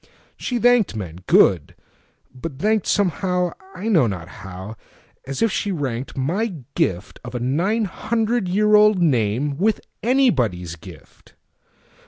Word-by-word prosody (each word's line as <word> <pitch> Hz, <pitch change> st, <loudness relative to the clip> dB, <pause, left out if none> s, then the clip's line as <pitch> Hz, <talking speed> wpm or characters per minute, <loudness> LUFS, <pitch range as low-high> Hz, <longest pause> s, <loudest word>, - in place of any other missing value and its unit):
She 245 Hz, -, -3 dB
thanked 240 Hz, -, +3 dB
men,—good! 90 Hz, -3 st, +2 dB, 0.6 s
but 135 Hz, +2 st, -7 dB
thankedSomehow—I 190 Hz, -1 st, -1 dB
know 165 Hz, -, +4 dB
not 90 Hz, -5 st, -5 dB
how—as 100 Hz, -, -8 dB
if 225 Hz, -, +2 dB
she 205 Hz, -, -1 dB
rankedMy 145 Hz, -, -3 dB
gift 105 Hz, -, -1 dB
of 125 Hz, 0 st, -8 dB
a -, -, -1 dB
nine 175 Hz, -, 0 dB
hundred 225 Hz, +1 st, -1 dB
years 210 Hz, +4 st, +2 dB
old 210 Hz, -2 st, +5 dB
nameWith 145 Hz, -, +1 dB, 0.2 s
anybody's 125 Hz, -, +1 dB
gift. 80 Hz, -, -15 dB
165 Hz, 105 wpm, -21 LUFS, -, 0.6 s, old